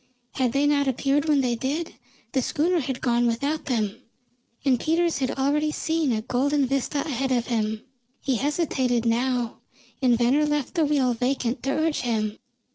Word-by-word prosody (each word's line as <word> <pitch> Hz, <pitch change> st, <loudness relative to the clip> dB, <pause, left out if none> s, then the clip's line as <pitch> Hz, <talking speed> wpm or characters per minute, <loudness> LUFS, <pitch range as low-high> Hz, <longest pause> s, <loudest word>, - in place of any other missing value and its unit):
Had 250 Hz, -3 st, 0 dB
they 280 Hz, +1 st, +2 dB
not 285 Hz, -1 st, +2 dB
appeared 275 Hz, +3 st, +1 dB
when 295 Hz, -3 st, +3 dB
they 250 Hz, -2 st, +1 dB
did, 280 Hz, +8 st, -3 dB, 0.4 s
the 265 Hz, -, +1 dB
schooner 335 Hz, +7 st, +1 dB
had 265 Hz, -3 st, -3 dB
gone 240 Hz, -1 st, +2 dB
without 280 Hz, +7 st, -1 dB
them, 220 Hz, -6 st, -1 dB, 0.6 s
and 260 Hz, -3 st, +3 dB
Peters 335 Hz, +2 st, +1 dB
had 265 Hz, 0 st, -1 dB
already 290 Hz, +3 st, +1 dB
seen 320 Hz, -3 st, 0 dB
a 220 Hz, -2 st, -1 dB
golden 275 Hz, +4 st, +1 dB
vista 275 Hz, +2 st, -1 dB
ahead 270 Hz, -3 st, -2 dB
of 240 Hz, -2 st, +1 dB
him. 220 Hz, -2 st, -1 dB, 0.4 s
He 265 Hz, -3 st, 0 dB
hesitated 265 Hz, -4 st, 0 dB
now, 240 Hz, 0 st, 0 dB, 0.4 s
and 245 Hz, -3 st, +4 dB
Venner 265 Hz, +6 st, +3 dB
left 295 Hz, -3 st, -1 dB
the 330 Hz, -4 st, +2 dB
wheel 275 Hz, -4 st, +2 dB
vacant 250 Hz, +1 st, -1 dB
to 270 Hz, -, -2 dB
urge 310 Hz, +2 st, +1 dB
him. 220 Hz, -3 st, -1 dB
265 Hz, 170 wpm, -25 LUFS, 240-295 Hz, 0.6 s, and